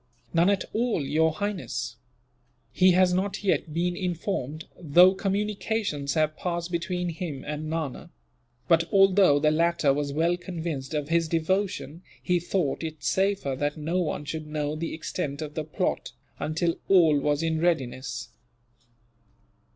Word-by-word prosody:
"None 170 +3 +4
at 200 -2 +1
all, 225 - 0
Your 160 +3 +2
Highness. 155 - -4 0.7
He 185 +7 +5
has 180 0 +4
not 195 +2 -1
yet 180 -4 +1
been 175 +3 0
informed, 170 -4 -3
though 175 +3 +6
communications 200 -6 -1
have 155 -1 +1
passed 175 0 -3
between 180 +1 -2
him 165 -5 -5
and 150 +1 -4
Nana. 160 -5 -4 0.6
But, 165 0 +3
although 195 -5 +5
the 150 +1 +3
latter 165 -3 +2
was 145 0 -2
well 165 +4 +1
convinced 165 -6 -5
of 150 -1 -2
his 165 -1 +2
devotion, 170 -1 -1 0.2
he 180 -1 +1
thought 170 -4 -1
it 160 -2 -6
safer 190 -8 +1
that 145 +2 -1
no 160 +4 -1
one 150 -3 -3
should 155 +2 -5
know 150 0 -2
the 165 +1 -4
extent 150 -3 -4
of 150 -2 -5
the 155 - -3
plot, 150 - -2 0.3
until 165 +2 -1
all 165 -6 +5
was 145 +2 0
in 160 -1 0
readiness." 130 -7 -1
165 Hz, 145 wpm, -26 LUFS, 150-180 Hz, 0.7 s, though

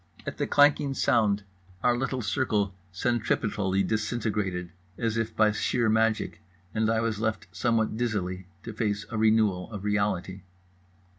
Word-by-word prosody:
At - - -5
the - - 0
clanking 145 -1 +4
sound 105 -5 +2 0.4
our 120 -1 +4
little 130 0 -2
circle 100 +1 0 0.2
centripetally 105 -2 0
disintegrated, 105 -4 -1 0.3
as 115 -1 -1
if 115 -1 -2
by 110 -1 +4
sheer 115 +2 +1
magic; 110 0 +1 0.3
and 110 0 +1
I 115 0 +2
was 110 -2 -1
left 110 -1 -1
somewhat 110 +3 0
dizzily 95 -6 -2 0.2
to 115 - -6
face 105 -1 -1
a 115 - -2
renewal 110 -4 +2
of 100 -3 -6
reality. 100 -2 -1
110 Hz, 140 wpm, -27 LUFS, 100-115 Hz, 0.4 s, clanking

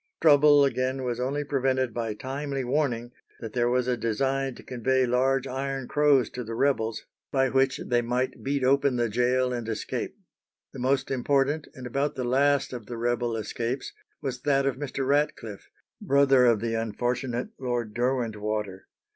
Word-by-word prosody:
Trouble, 145 -2 +6
again, 130 0 -1
was 120 -1 -2
only 140 +4 -1
prevented 130 -3 0
by 115 -2 -3
timely 135 +3 -4
warning 125 -3 -1 0.3
that 110 -2 -7
there 120 -1 +2
was 125 0 +1
a 125 - +2
design 135 +3 -1
to - - -13
convey 130 +1 +1
large 130 +2 +1
iron 135 0 -3
crows 145 -3 +3
to 125 - -5
the 115 0 -6
rebels, 115 -4 0 0.3
by 135 -1 +2
which 135 +1 +2
they 120 -1 +2
might 125 +2 -2
beat 140 0 -1
open 135 0 +3
the 120 -1 0
gaol 125 +3 +1
and 120 -2 -4
escape. 110 -1 -4 0.6
The 135 - -8
most 135 +1 0
important 140 +3 +1
and 130 - -9
about 140 +4 -1
the 130 - -3
last 140 +3 +2
of 120 -4 -7
the 120 - -6
rebel 120 0 -1
escapes 115 +4 -3 0.3
was 125 -2 -3
that 140 -1 +2
of 135 - +1
Mr. 135 -1 -3
Ratcliffe, 135 -7 -1 0.3
brother 135 -2 +4
of 115 -3 +3
the 115 0 -1
unfortunate 120 - -2
Lord 120 -4 -2
Derwentwater. 110 -5 -2
130 Hz, 165 wpm, -27 LUFS, 120-135 Hz, 0.6 s, Trouble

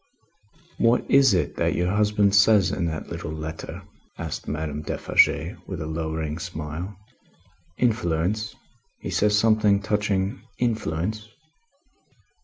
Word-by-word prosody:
"What 115 +1 +3
is 135 -6 +6
it 90 - -1
that - - +1
your 90 +1 +1
husband 105 -1 +2
says 100 -2 +5
in 90 - -1
that 80 -1 -4
little - - -5
letter?" 80 +1 -6 0.3
asked - - -5
Madame 75 -1 -3
Defarge, 80 +2 +2
with 95 -4 -5
a 80 - -4
lowering 80 0 -3
smile. 85 +2 -6 0.8
"Influence; 105 -3 0 0.4
he - - -6
says 105 0 +3
something 105 -2 +4
touching 105 -2 -1 0.2
influence?" 110 -2 -2
95 Hz, 115 wpm, -24 LUFS, 80-105 Hz, 0.8 s, is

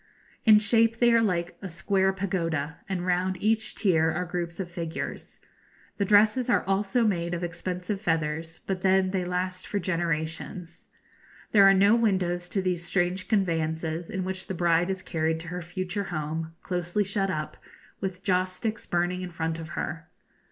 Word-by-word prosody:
In 215 -2 +8
shape 225 +2 +3
they 240 0 +4
are 230 - +5
like 175 -5 -1
a 195 - -5
square 190 +3 +1
pagoda, 165 -6 -2
and 180 -2 -2
round 185 +1 +1
each 220 +2 +1
tier 165 -6 +3
are 180 +2 -1
groups 175 0 -4
of 190 - -2
figures. 170 -1 -5 0.6
The 200 - +2
dresses 215 +5 +4
are - - +3
also 195 +4 +1
made 175 -5 0
of 175 - -4
expensive 180 +3 -3
feathers, 160 -3 -1
but 190 -2 -2
then 190 0 +3
they 190 -2 0
last 180 +1 -3
for 205 - -2
generations. 170 -1 -3 0.6
There 200 -2 +7
are 195 - +6
no 200 +3 +5
windows 180 -6 +1
to 195 0 -1
these 180 -2 -1
strange 180 +1 0
conveyances, 165 -4 0
in 190 -4 -2
which 190 +1 -3
the 190 - -3
bride 170 +1 +2
is 190 -1 -3
carried 160 -1 -1
to 165 - -8
her 180 +1 -4
future 185 +3 -3
home, 160 0 -4
closely 180 +2 -1
shut 195 0 -1
up, 155 -3 -3 0.4
with 190 0 -4
joss 185 -2 +1
sticks 215 +3 -4
burning 175 +1 0
in 180 - -5
front 165 -1 -3
of 165 +1 -8
her. 160 +1 -4
180 Hz, 175 wpm, -27 LUFS, 170-195 Hz, 0.6 s, In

